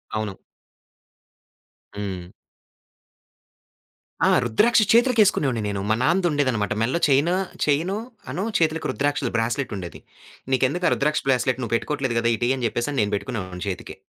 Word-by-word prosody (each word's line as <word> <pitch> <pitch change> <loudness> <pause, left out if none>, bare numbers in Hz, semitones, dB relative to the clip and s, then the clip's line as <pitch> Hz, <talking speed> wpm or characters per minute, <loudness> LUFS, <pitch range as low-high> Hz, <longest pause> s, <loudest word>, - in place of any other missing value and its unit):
అవును. 110 -3 -3 1.6
హ్మ్. 95 -3 -5 1.9
ఆ! - - +4 0.2
రుద్రాక్ష 215 - +3
చేతులకేసుకునేవాడిని 210 - +3
నేను, 100 -1 -3
మా 110 - +3
నాన్నదుండేదన్నమాట. 145 - +1
మెల్లో 130 +9 +1
చెయిను, 145 +6 +3 0.3
చెయిను 165 +8 +1 0.3
అను 190 - -3 0.2
చేతులకి 160 0 0
రుద్రాక్షలు 145 -3 -1
బ్రాస్లెటుండేది. 115 -6 -3 0.5
నీకెందుకా 135 +8 +1
రుద్రాక్ల 150 +1 0
బ్రాస్లెట్ 130 0 +1
నువ్వు 115 -1 -3
పెట్టుకోవట్లేదు 130 -2 -1
గదా, 115 0 +1
ఇటీ 120 +2 0
అని 125 - -2
జెప్పేసని 130 +4 -2
నేను 105 0 -1
బెట్టుకునేవాడిని 95 -5 -5
చేతికి. 90 - -6
130 Hz, 115 wpm, -23 LUFS, 110-155 Hz, 1.9 s, ఆ